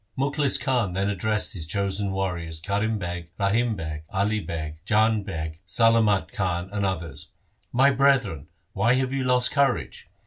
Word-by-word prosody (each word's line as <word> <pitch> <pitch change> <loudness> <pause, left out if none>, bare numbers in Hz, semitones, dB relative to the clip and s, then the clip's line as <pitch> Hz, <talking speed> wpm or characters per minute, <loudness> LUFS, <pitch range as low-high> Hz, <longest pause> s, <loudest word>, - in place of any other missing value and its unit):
Mukhlis 140 +1 +1
Khan 125 -9 0
then 100 +2 0
addressed 105 +2 -1
his 80 -5 -6
chosen 100 +1 -1
warriors 90 -4 -3
Karim 100 +5 -1
Beg, 85 -3 -5
Rahim 110 +3 +2
Beg, 80 -3 -5
Ali 105 +3 0
Beg, 80 -5 -5
Jang 110 +1 +3
Beg, 80 -5 -5
Salamat 110 -1 +3
Khan, 90 -1 -2
and 100 -1 -1
others: 85 -5 -3 0.2
' - - -43
My 140 +1 +7
brethren, 130 - +2 0.3
why 115 +6 +3
have 130 0 0
you 135 -1 0
lost 125 0 +3
courage 140 - 0
100 Hz, 160 wpm, -25 LUFS, 85-115 Hz, 0.3 s, My